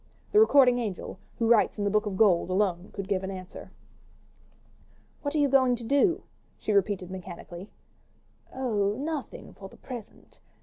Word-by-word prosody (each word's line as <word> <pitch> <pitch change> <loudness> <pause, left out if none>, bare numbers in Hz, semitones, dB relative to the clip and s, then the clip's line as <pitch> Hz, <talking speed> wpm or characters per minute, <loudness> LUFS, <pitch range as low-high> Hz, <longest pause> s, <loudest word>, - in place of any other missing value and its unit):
The 420 - +5
recording 270 - +6
angel, 200 -4 -5 0.2
who 230 - 0
writes 225 -2 +4
in 205 - -2
the 205 - +1
book 215 +1 +1
of 195 -2 -3
gold, 185 -5 +4
alone 185 -1 0
could 195 -1 -6
give 195 -2 -1
an 190 - -4
answer. 185 -1 -9 1.5
"What 285 +1 -3
are - - +2
you 290 -1 +4
going 260 -2 +4
to 235 - -8
do?" 285 - +2 0.3
she 215 - -2
repeated 195 -2 0
mechanically. 180 +1 -9 0.8
"Oh, 210 -6 0
nothing 295 -2 -5
for 195 -1 -11
the - - -17
present. 240 -5 -11
210 Hz, 165 wpm, -27 LUFS, 190-255 Hz, 1.5 s, recording